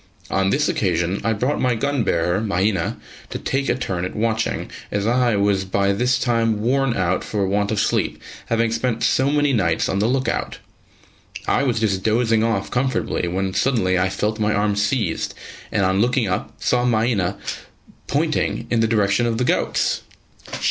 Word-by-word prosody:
On 95 +1 +2
this - - +2
occasion 85 +4 0
I 115 - +1
brought 125 +7 -1
my 125 -2 +2
gun 140 +3 0
bearer, 85 +2 +1
Mahina, 100 -1 0 0.3
to - - -4
take 135 +1 -1
a - - +2
turn 95 -8 -3
at 90 - -4
watching, 110 0 -1 0.2
as 100 0 -1
I 120 -1 +2
was 100 -1 +2
by 100 +1 +1
this 125 +5 +1
time 115 -3 +1
worn 130 +2 +1
out 95 0 0
for 100 -2 -1
want 100 +1 0
of 110 - 0
sleep, - - 0 0.3
having 115 0 +1
spent 115 0 -1
so 130 +1 +3
many 145 -1 +2
nights 85 -8 +1
on 95 - -1
the 105 - +2
look 130 +2 0
out. - - -2 0.9
I - - +2
was 125 -5 +1
just 100 -4 0
dozing 115 +1 +2
off 115 -4 -1
comfortably 130 -7 0
when 95 +2 -2
suddenly 95 -5 +1
I 95 +1 +2
felt 105 +3 -2
my 105 0 +1
arm 105 0 +1
seized, 100 -3 -1 0.4
and 100 - +1
on 95 +1 +2
looking 125 -1 +2
up 100 +4 -3
saw 125 0 +1
Mahina 110 -6 +1 0.7
pointing - - 0
in 115 - +2
the 115 - +3
direction 105 +1 +2
of 115 -1 -1
the 125 - +1
goats. - - +1
110 Hz, 180 wpm, -21 LUFS, 95-120 Hz, 0.9 s, so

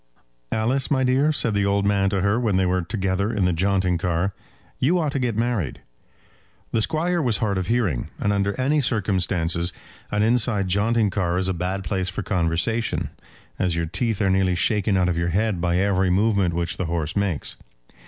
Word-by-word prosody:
"Alice, 125 +5 +1
my 130 -2 +2
dear," 130 +4 +3
said 115 -7 0
the 100 0 +1
old 100 0 +1
man 100 -1 +2
to 95 -1 -1
her 100 +4 +2
when 110 -6 +1
they 95 - +2
were 90 0 +1
together 95 +2 -1
in 100 -5 0
the 90 - +2
jaunting 95 0 +1
car, 90 +3 -1 0.5
"you 165 +8 +2
ought 155 -4 0
to 140 - -2
get 120 -4 -1
married." 115 - -1 0.9
The 115 - +1
Squire 170 +6 0
was 120 -6 +1
hard 100 -4 0
of 90 - -3
hearing, 110 - 0
and 105 - +1
under 100 +3 -1
any 145 +3 +2
circumstances 90 -7 0 0.4
an 105 0 +1
inside 110 -3 +2
jaunting 105 +2 +2
car 90 -2 0
is 95 0 0
a - - 0
bad 90 +2 -3
place 95 +2 -2
for 95 - -4
conversation, 90 +5 0 0.5
as 90 -2 +1
your 85 0 -1
teeth 105 +5 -1
are 95 - +2
nearly 95 -1 +2
shaken 100 +2 +1
out 90 -1 +2
of 85 -1 0
your 85 0 0
head 100 0 0
by 85 0 +1
every 95 -1 +2
movement 100 -2 +2
which 85 0 -2
the 95 - -2
horse 80 -2 -2
makes. 100 -7 -1
100 Hz, 195 wpm, -23 LUFS, 90-115 Hz, 0.9 s, dear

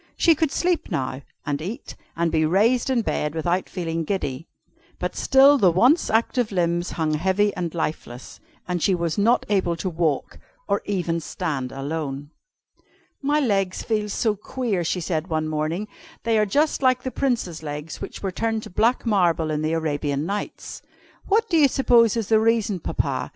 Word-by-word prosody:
She 335 - +5
could 315 -2 0
sleep 355 -1 0
now, 135 -6 -3 0.2
and 145 -1 -2
eat, 220 - -6 0.2
and 170 0 0
be 160 -1 +2
raised 220 +11 +2
in 245 -3 +1
bed 150 -5 -2
without 175 +3 -1
feeling 165 -3 -3
giddy. 155 -5 -3 0.5
But - - -3
still 275 +1 +5
the 190 - +5
once 250 - +3
active 230 +1 +1
limbs 175 -1 0
hung 155 -2 -1
heavy 190 +6 +1
and 175 -3 -3
lifeless, 135 -6 -5 0.3
and 180 -2 -2
she 190 - +3
was 170 +2 -2
not 230 +4 +3
able 185 -4 +1
to 185 +2 -3
walk, 160 -4 -1 0.3
or 200 0 +1
even 175 -4 -1
stand 150 -6 -4
alone. 145 0 -4 0.9
"My 290 +2 +2
legs 195 -8 0
feel 215 -2 -1
so 215 +1 0
queer," 210 -3 -2
she 180 +2 -1
said 160 0 -2
one 155 -2 -1
morning, 155 +6 -2 0.4
"they 225 -1 +2
are 210 - +2
just 295 +10 +1
like 255 -1 +3
the 260 - -3
Prince's 235 - -1
legs 150 0 -6
which - - -7
were 195 - -1
turned 225 +3 -2
to - - -10
black 230 +8 +1
marble 175 -7 +2
in 150 0 -1
the 155 +1 0
Arabian 145 -2 -1
Nights. 200 +3 -5 0.5
What 445 +3 +2
do 345 -5 +2
you 295 -3 +6
suppose 240 -4 +3
is 225 -4 -2
the 220 -1 +5
reason, 220 -3 +1
Papa? - - -2
185 Hz, 175 wpm, -23 LUFS, 160-230 Hz, 0.9 s, you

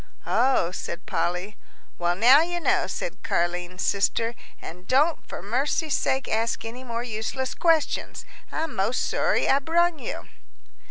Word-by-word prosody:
"Oh," 245 -8 +2
said 180 0 -6
Polly. 180 +4 -2 0.4
"Well, 175 0 +1
now 250 - +7
you 350 +1 -1
know," - - +2
said - - -5
Car'line's 175 +1 -1
sister, 225 +3 +1 0.3
"an' 180 +2 -10
don't 295 - +2
for - - -7
mercy's 275 +8 0
sakes 265 0 0
ask 225 +1 -1
any 240 +3 -7
more 235 -1 -4
useless 245 +3 -3
questions. 330 -3 +1 0.3
I'm 320 0 -3
most 225 +6 0
sorry - - +1
I 275 - +4
brung 335 +2 +2
you." - - -6
240 Hz, 145 wpm, -25 LUFS, 190-295 Hz, 0.4 s, now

